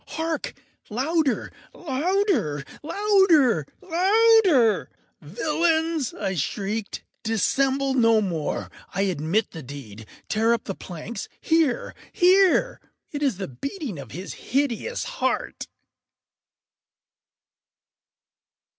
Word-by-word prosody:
—hark! 320 -1 -3 0.3
louder! 280 +4 0 0.2
louder! 300 - 0 0.2
louder! 325 - +3 0.2
louder! 375 - +4 0.3
“Villains!” 315 - 0
I 195 -2 -2
shrieked, 200 +7 -3 0.2
“dissemble 270 +5 +1
no 230 -3 +4
more! 170 -7 -3 0.2
I 195 - +1
admit 185 +3 0
the 160 - -8
deed!—tear 140 - -3
up - - -7
the 195 - -4
planks!—here, 235 - -2 0.2
here!—It 370 -3 +2
is 270 -9 +1
the 195 - -4
beating 255 - -6
of 135 -4 -9
his 180 - -7
hideous 280 - -2
heart! - - -2
255 Hz, 85 wpm, -24 LUFS, -, 0.3 s, louder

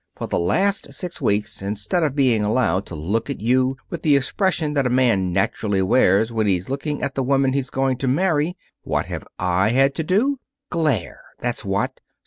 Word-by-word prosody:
For - - -5
the - - -1
last 195 - 0
six 180 -2 -5
weeks, 105 0 0
instead 105 - -1
of 150 -4 0
being 125 -7 +3
allowed 105 -4 +1
to 90 - -7
look 100 - -2
at 140 - -3
you 130 +4 +1
with 170 - -4
the 150 -3 +4
expression 155 +2 0
that 140 -3 +1
a - - 0
man 120 -8 +2
naturally 95 +1 0
wears 105 +2 +3
when 110 -2 +1
he's 95 0 0
looking 145 +2 -3
at 140 - -1
the 135 - -1
woman 135 0 +2
he's 135 -2 -1
going 135 -1 0
to 130 - -2
marry, 160 +3 +1 0.2
what - - -1
have - - -6
I 90 +3 +1
had 135 +3 +3
to 160 - -2
do? 240 - +1 0.3
Glare, 150 - -1 0.2
that's 120 -1 -3
what! 100 +7 -2
130 Hz, 195 wpm, -22 LUFS, 105-145 Hz, 0.3 s, the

